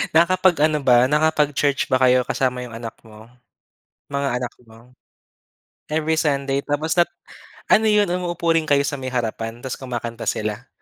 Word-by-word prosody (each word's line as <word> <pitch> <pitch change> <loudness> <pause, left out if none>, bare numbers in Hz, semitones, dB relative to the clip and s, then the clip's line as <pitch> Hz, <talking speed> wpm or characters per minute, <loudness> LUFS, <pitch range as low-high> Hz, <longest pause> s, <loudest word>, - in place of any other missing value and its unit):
Nakapag-ano 170 -3 +3
ba 125 -1 +5
nakapag-church 150 -1 +1
ba - - +1
kayo 125 0 +4
kasama 125 -1 -1
'yong 125 -2 -7
anak 115 -1 -7
mo? 110 +1 -15 0.8
Mga 140 0 -2
anak 125 -1 -5
mo? 115 +2 -19 1.0
Every 160 +1 0
Sunday 140 -3 0
tapos 155 +3 -1
nap 175 0 +3 0.6
ano 220 - +5
'yon 210 -2 +3
umuupo 175 -1 -2
rin 160 - +1
kayo 145 -1 +4
sa 145 - -2
may 130 -1 -6
harapan 115 -1 -3
tas 130 0 -5
kumakanta 120 -3 -6
sila? 110 +4 -3
140 Hz, 150 wpm, -21 LUFS, 120-155 Hz, 1.0 s, ba